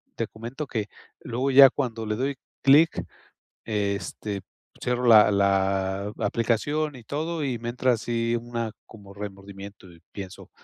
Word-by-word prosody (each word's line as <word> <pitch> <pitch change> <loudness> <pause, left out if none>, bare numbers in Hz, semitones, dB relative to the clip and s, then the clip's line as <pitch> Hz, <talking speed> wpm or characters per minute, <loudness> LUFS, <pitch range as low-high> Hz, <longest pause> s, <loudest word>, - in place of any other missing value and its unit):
te 115 - -2
comento, 120 +7 -7
que 110 -5 -3 0.3
luego 130 +4 -2
ya 135 0 +10
cuando 115 -6 -3
le 105 0 -1
doy 135 +4 -1 0.3
clic, 150 +4 +5 0.6
este, 100 -1 -3 0.4
cierro 125 0 -1
la 110 -3 +7
la 95 0 +1
aplicación 145 +7 0
y 120 - -12
todo, 155 +4 -3
y 125 -4 -2
me 120 - -4
entra 125 +1 +1
así 115 +1 -1
una 115 -1 -4
como 100 -3 -14
remordimiento 100 -1 -9
y 85 - -17
pienso: 95 -2 -9
115 Hz, 140 wpm, -25 LUFS, 100-125 Hz, 0.6 s, ya